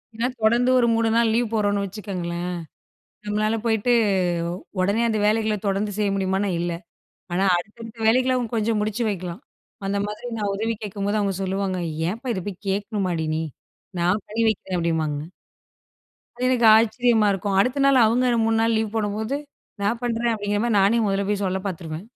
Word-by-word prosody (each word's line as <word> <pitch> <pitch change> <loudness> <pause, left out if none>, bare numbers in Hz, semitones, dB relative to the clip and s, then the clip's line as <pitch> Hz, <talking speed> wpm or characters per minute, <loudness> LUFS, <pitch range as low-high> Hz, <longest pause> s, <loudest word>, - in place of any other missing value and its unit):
ஏன்னா, 235 +2 0
தொடர்ந்து 235 +3 +3
ஒரு 235 - +3
3 225 0 +2
நாள் 230 -1 +3
லீவ் 230 -1 0
போடுறோம்னு 205 -2 +1
வச்சுக்கோங்களேன். 180 -3 -4 0.8
நம்மளால 215 +2 0
போயிட்டு, 225 +1 +2 0.9
உடனே 200 +5 +2
அந்த 220 -1 0
வேலைகள 215 0 +2
தொடர்ந்து 200 +1 0
செய்ய 205 -1 +1
முடியுமானா, 195 +1 0
இல்ல. 175 0 -1 0.6
ஆனா, 185 +2 +1
அடுத்தடுத்த 225 +5 -8
வேலைகள 255 +3 +3 0.2
கொஞ்சம் 225 0 +1
அவுங்க 210 - 0
முடிச்சு 215 +3 -1
வைக்கலாம். 180 +1 -5 0.5
அந்த 200 - 0
மாதிரி 210 +4 -6
நான் 205 -2 -1
உதவி 225 +3 -1
கேட்கும்போது, 205 +1 -2
அவுங்க 200 -2 0
சொல்லுவாங்க. 190 -1 -1 0.3
ஏன்ப்பா! 235 +6 -5
இத 185 - -3
போய் 195 0 -7
கேட்கணுமாடி 195 -4 -1
நீ! 160 - -1 0.6
நான் 180 +4 +1
பண்ணி 220 +2 -2
வைக்கிறேன் 190 -3 -3
அப்பிடிம்பாங்க. 160 -3 0 1.2
அது 250 - -1
எனக்கு 245 -3 +3
ஆச்சரியமா 230 0 +3
இருக்கும். 195 0 -1
அடுத்த 255 +6 +2
நாள், 275 -1 +5
அவுங்க 245 +3 +2
3 225 0 +2
நாள் 225 0 +2
லீவ் 220 -1 -2
போடும்போது, 215 +4 -1 0.5
நான் 220 +4 0
பண்றேன். 235 0 0
அப்பிடிங்கிற 205 -1 -1
மாதிரி, 235 -3 +2
நானே 200 +4 +4
முதல்ல 195 0 0
போய் 205 -1 0
சொல்ல 190 +1 -1
பார்த்துருவேன். 170 0 -6
210 Hz, 165 wpm, -23 LUFS, 195-225 Hz, 1.2 s, நாள்